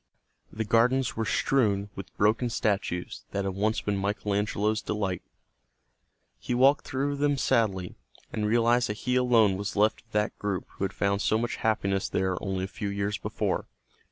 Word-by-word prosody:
The 110 +1 -3
gardens 125 +4 +2
were 115 - -1
strewn 105 -8 +1
with 95 - -10
broken 110 +4 +2
statues 100 -5 -2
that 100 0 -1
had 95 - -1
once 105 +3 0
been 105 -1 -1
Michael 100 +1 -1
Angelo's 105 +1 0
delight. 100 -4 -2 1.2
He 125 - -2
walked 135 +4 +4
through 140 +2 -1
them 145 0 +2
sadly, 95 -8 +1 0.4
and 105 -1 -1
realized 120 +2 +3
that 105 - -3
he 125 0 +1
alone 115 -6 +4
was 100 -2 -4
left 105 +2 +2
of 115 - -37
that 105 0 0
group 100 -3 -2
who 95 - -3
had - - -4
found 100 0 0
so 110 - +2
much 120 +1 -2
happiness 100 -3 0
there 95 0 0
only 95 -1 -2
a - - -2
few 100 +1 -4
years 100 0 -2
before. - - -2
105 Hz, 175 wpm, -28 LUFS, 100-115 Hz, 1.2 s, walked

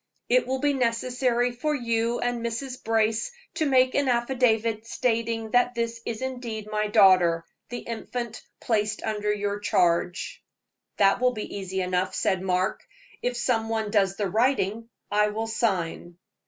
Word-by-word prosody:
It - - +3
will 265 - 0
be 285 +2 +1
necessary 245 0 +1
for 300 +5 -1
you 230 -2 0
and 245 -1 -1
Mrs. 250 +3 -4
Brace 225 - +1 0.2
to 320 -2 0
make 255 -1 +4
an 285 -1 +1
affidavit 235 -3 +1
stating 230 -2 -1
that 245 +1 +3
this 230 0 -2
is 230 +2 -3
indeed 240 -5 -5
my 215 0 0
daughter, 185 -5 +5 0.2
the 245 - -5
infant 235 0 -5 0.2
placed 210 -2 0
under 210 -1 -1
your 205 0 -2
charge." 175 -3 0 0.5
"That 200 +3 +4
will 250 0 +3
be 215 -3 -6
easy 190 -1 -3
enough," 180 0 -1
said 190 -1 +1
Mark. 185 0 0 0.4
"If 245 0 -1
some 225 -2 0
one 220 -2 -1
does 195 -3 +2
the 205 - 0
writing, 225 +1 0 0.2
I 210 0 +3
will 215 +2 -2
sign." 180 -6 -2
225 Hz, 155 wpm, -26 LUFS, 205-245 Hz, 0.5 s, daughter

